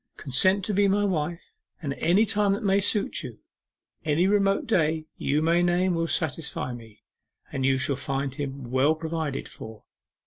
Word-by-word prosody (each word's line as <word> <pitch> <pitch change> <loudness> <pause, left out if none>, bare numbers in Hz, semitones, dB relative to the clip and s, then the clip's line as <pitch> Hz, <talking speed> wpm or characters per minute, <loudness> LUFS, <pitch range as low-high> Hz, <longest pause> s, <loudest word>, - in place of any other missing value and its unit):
Consent 185 +8 +3
to 210 - -2
be 200 +1 +3
my 205 +1 +2
wife 170 -2 -3 0.3
at 140 -2 -2
any 190 +6 +4
time 205 -2 +1
that 200 - -3
may 195 0 +3
suit 205 +1 +1
you - - -8 0.7
any 155 +3 +2
remote 195 0 +2
day 160 -6 +1
you 150 +3 0
may 170 +2 +3
name 175 +1 +2
will 165 0 -1
satisfy 160 -6 -2
me 115 -3 -13 0.5
and 135 -2 -1
you 135 -1 +3
shall 130 +1 0
find 135 0 -3
him 135 -3 -6
well 135 +5 +3
provided 160 -3 -4
for. 110 -1 -11
160 Hz, 170 wpm, -26 LUFS, 140-195 Hz, 0.7 s, any